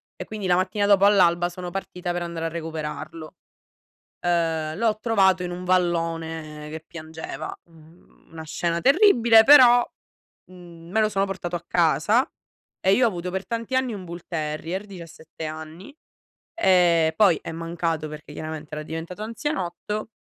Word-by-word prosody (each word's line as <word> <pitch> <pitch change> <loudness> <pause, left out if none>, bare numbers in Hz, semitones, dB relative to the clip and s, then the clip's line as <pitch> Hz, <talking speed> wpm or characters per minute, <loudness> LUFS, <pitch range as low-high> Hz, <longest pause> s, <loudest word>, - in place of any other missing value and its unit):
e - - -6
quindi 210 -3 -5
la 180 - +4
mattina 185 +3 0
dopo 200 -1 +4
all'alba, 175 -4 +4
sono 180 0 -7
partita 180 -1 -5
per 175 - -3
andare 170 -1 -4
a - - +1
recuperarlo. 155 -1 -6 0.9
Uhm, 165 -3 0
l'ho 220 0 +1
trovato 195 -5 +3
in 180 - -4
un 180 +1 -6
vallone 165 -4 -1
che 160 +1 -8
piangeva. 160 -2 -7
Uhm, 165 0 -22
una 160 -1 -9
scena 170 +2 -2
terribile, 255 - +6
però, 245 -2 +8 0.7
mhmm, 170 -2 -13
me 220 +4 +1
lo 215 - +3
sono 195 -1 0
portato 185 -3 -5
a 170 - -3
casa, 175 - +2 0.5
e 190 +1 +4
io 250 - +3
ho - - +4
avuto 180 -2 -5
per 190 0 -4
tanti 230 +4 -3
anni 255 -4 0
un 190 - -7
Bull 170 0 -8
Terrier, 160 +4 -4
17 165 -4 -10
anni. 160 - -9 0.6
E 175 - +4
poi 195 -7 +5
è - - -6
mancato 165 -1 -3
perché 150 0 -10
chiaramente 155 -1 -7
era 155 - -5
diventato 165 +6 -6
anzianotto 215 - -4
175 Hz, 155 wpm, -24 LUFS, 160-200 Hz, 0.9 s, però